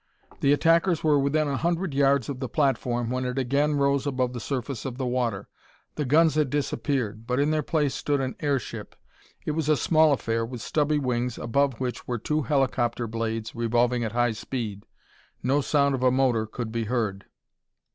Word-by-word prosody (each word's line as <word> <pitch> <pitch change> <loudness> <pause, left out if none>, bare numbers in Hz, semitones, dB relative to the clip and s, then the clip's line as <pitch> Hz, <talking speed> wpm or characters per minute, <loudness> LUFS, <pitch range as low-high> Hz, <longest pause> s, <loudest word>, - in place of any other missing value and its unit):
The 140 - +3
attackers 165 +3 +3
were 150 -2 +4
within 150 +2 +1
a 140 -2 -1
hundred 170 0 -1
yards 140 -2 +3
of 140 -3 -5
the 130 -2 -4
platform 120 -4 0
when 130 0 -1
it 125 +1 -3
again 140 +3 +1
rose 140 0 +1
above 130 -2 -1
the 120 - -4
surface 130 -2 -4
of 125 -2 -5
the 130 - -2
water. 120 -5 -1 0.5
The 150 - -2
guns 155 +4 +4
had 150 -3 +1
disappeared, 125 -6 -2
but 125 +1 0
in 145 +2 +2
their 155 0 +1
place 150 -2 0
stood 145 0 -1
an 130 -1 -2
airship. 140 -5 -3 0.5
It - - 0
was 155 0 -1
a 155 - +4
small 155 +3 +4
affair 115 -4 0
with 120 +1 -6
stubby 150 +5 0
wings 125 -3 -1
above 135 +1 0
which 125 -2 -4
were 125 - -1
two 150 +7 -1
helicopter 125 -3 0
blades 115 0 -3
revolving 120 +1 +1
at 110 -1 -3
high 120 0 +2
speed. 110 -3 -5 0.6
No 135 +4 +2
sound 140 0 +2
of 130 - -2
a 130 - +5
motor 125 -4 +2
could 110 +1 -5
be 115 0 -2
heard. 105 -4 -2
130 Hz, 190 wpm, -26 LUFS, 120-145 Hz, 0.6 s, a